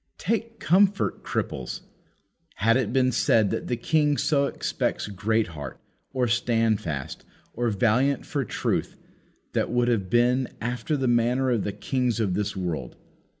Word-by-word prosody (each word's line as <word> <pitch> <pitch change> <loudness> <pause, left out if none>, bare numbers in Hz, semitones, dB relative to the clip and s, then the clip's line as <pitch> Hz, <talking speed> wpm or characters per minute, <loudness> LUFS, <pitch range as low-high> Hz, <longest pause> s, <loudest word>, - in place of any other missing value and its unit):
Take 230 +3 -2
comfort, 195 +4 +2
cripples! - - -3 0.7
Had 115 +3 +3
it 125 -5 +1
been 130 0 +3
said 110 -3 +3
that - - -3
the 120 - -1
King 150 +3 +2
so 140 -2 +2
expects - - -2
Greatheart, 100 -6 -2 0.3
or 130 -2 0
Standfast, 115 - 0 0.3
or 120 0 0
Valiant 120 +6 +2
for 140 -2 -1
truth, 110 - -2 0.6
that - - 0
would 120 0 +2
have 100 -6 0
been 125 +2 +3
after 125 +6 -2
the 135 -2 0
manner 120 +2 +2
of 115 -4 +1
the 105 - -2
kings 120 +3 -1
of 100 -5 +1
this 105 +2 -1
world. 80 -9 -4
120 Hz, 145 wpm, -26 LUFS, 105-130 Hz, 0.7 s, Had